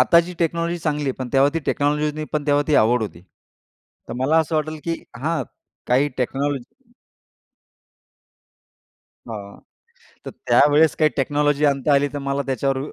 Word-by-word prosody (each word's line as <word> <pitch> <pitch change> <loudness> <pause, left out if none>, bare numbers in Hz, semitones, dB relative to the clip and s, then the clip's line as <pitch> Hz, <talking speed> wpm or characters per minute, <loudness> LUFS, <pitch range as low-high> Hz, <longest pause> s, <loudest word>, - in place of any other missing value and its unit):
आताची 170 +1 +4
टेक्नॉलॉजी 170 +1 -1
चांगली 150 -2 -2
आहे. 135 - 0
पण 130 -1 -4
तेव्हा 135 +1 +5
ती - - +1
टेक्नॉलॉजी 150 +1 +1
नव्हती, 155 +1 -3
पण 150 -1 -2
तेव्हा 145 0 +3
ती 150 - +3
आवड 115 +2 +3
होती. 95 -5 -7 0.9
तर - - -5
मला 155 +5 +3
असं 160 0 0
वाटल, 155 0 -2
की 170 - -1 0.2
हां. 155 +3 -1 0.4
काही 130 +4 +3
टेक्नॉलॉजी 135 +1 -3 2.4
हां, 100 -3 -8 0.7
तर - - -4
त्यावेळेस 145 +5 +3
काही 155 -1 +3
टेक्नॉलॉजी 145 +2 +1
आणता 140 +1 +1
आली, 140 +1 +3
तर 145 - -4
मला 140 +1 0
त्याच्यावर 135 +1 0
145 Hz, 150 wpm, -21 LUFS, 135-155 Hz, 2.4 s, तेव्हा